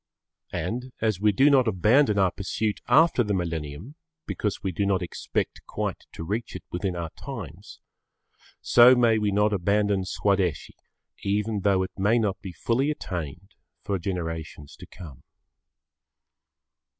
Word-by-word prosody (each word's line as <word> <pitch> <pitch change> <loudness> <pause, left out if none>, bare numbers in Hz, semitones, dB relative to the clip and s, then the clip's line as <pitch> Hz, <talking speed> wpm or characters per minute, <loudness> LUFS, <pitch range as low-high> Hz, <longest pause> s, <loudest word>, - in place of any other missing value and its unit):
And, 125 +3 -3
as 110 -4 0
we 105 0 +4
do 135 +9 +4
not 130 -3 +4
abandon 110 +4 +3
our 95 -2 +3
pursuit 105 +2 -3
after 140 0 +5
the 105 -2 -1
millennium, 85 - -4 0.3
because 105 -2 -3
we 95 - -1
do 95 +4 -1
not 95 -2 +1
expect 85 - -3
quite - - -4
to - - -7
reach 105 +7 -4
it - - -7
within 90 +1 -2
our 85 -2 -4
times, 100 - -9 0.8
so 120 +2 +7
may 115 -3 +3
we 105 -1 0
not 105 +1 +2
abandon 100 +1 +1
Swadeshi 95 -4 0 0.5
even 105 +2 -1
though 95 -1 +2
it 95 - -5
may 105 +5 +3
not 100 -4 -1
be 95 -2 -7
fully 120 - 0
attained 90 - -5 0.3
for 100 -2 -2
generations 80 -5 -5
to - - -12
come. 75 -9 -12
100 Hz, 145 wpm, -26 LUFS, 90-110 Hz, 0.8 s, so